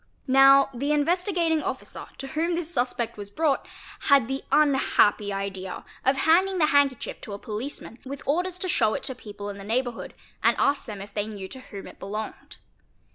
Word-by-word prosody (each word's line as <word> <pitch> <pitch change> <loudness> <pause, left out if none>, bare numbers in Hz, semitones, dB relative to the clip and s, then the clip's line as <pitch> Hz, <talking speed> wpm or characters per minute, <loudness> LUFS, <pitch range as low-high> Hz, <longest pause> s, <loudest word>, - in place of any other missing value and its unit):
Now 275 0 +6
the 280 +4 -1
Investigating 335 +1 +1
Officer - - -5
to 270 - -6
whom 330 +3 0
this 340 0 -3
suspect 240 -3 -1
was 205 -1 -7
brought 290 +5 0 0.4
had 275 -5 +6
the 270 +1 -3
unhappy 265 -8 +3
idea 195 -1 -5 0.2
of 265 +1 +3
handing 370 +6 +3
the 320 - +4
handkerchief 285 -4 +1
to 205 - -7
a - - -4
policeman 230 +3 -6
with 275 +1 -7
orders 355 +5 0
to 370 - -1
show 220 -10 +2
it - - -4
to 265 - -3
people 205 -4 -8
in 200 - -10
the - - -8
neighbourhood 240 +3 -2 0.3
and - - +4
ask 280 0 +2
them 210 -5 -7
if 200 0 -10
they 205 0 -1
knew 200 -3 -7
to 260 - -9
whom 200 -6 -9
it - - -12
belonged. 210 +2 -6
265 Hz, 185 wpm, -26 LUFS, 210-305 Hz, 0.4 s, Now